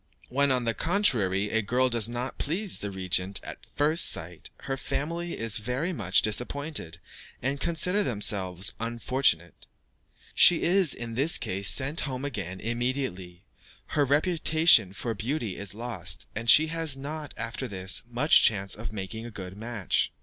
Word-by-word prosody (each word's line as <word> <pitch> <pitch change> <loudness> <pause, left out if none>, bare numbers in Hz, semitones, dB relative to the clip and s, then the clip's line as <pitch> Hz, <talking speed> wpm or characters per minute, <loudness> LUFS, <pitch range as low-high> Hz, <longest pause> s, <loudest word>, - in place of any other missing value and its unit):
When, 140 +2 +2
on 130 -2 +1
the 115 - +1
contrary, 105 - +1
a 110 - +1
girl 125 +5 +1
does 115 -3 +2
not 120 +2 -5
please 185 +6 -1
the 105 - -4
regent 95 0 0
at - - -10
first 155 +3 +3
sight, 85 0 -2
her 135 - -3
family 170 +6 -4
are 115 - -2
very 125 - -1
much 95 - +1
disappointed, 125 - -3 0.4
and 135 +3 -2
consider 180 +5 0
themselves 100 - 0
unfortunate. 115 - -1 0.7
She 175 - +6
is, 180 -4 +4
in 115 -1 -5
this 140 +7 +3
case, 95 +1 -1
sent 140 +4 +1
home 130 -1 -3
again 95 -9 -5
immediately, 120 -7 -3 0.5
her 145 - +3
reputation 155 - +3
for 115 +4 -4
beauty 115 -1 -3
is 100 0 -4
lost, 120 0 -5
and 115 +1 -3
she 155 - +8
has 160 -4 -1
not, 150 +2 -7
after 115 +3 -4
this, 95 -4 -3
much 125 +6 +5
chance 100 -4 +3
of 110 0 -6
making 110 +3 -6
a - - -8
good 95 -4 -9
match. 110 -2 -1
120 Hz, 155 wpm, -27 LUFS, 100-145 Hz, 0.7 s, she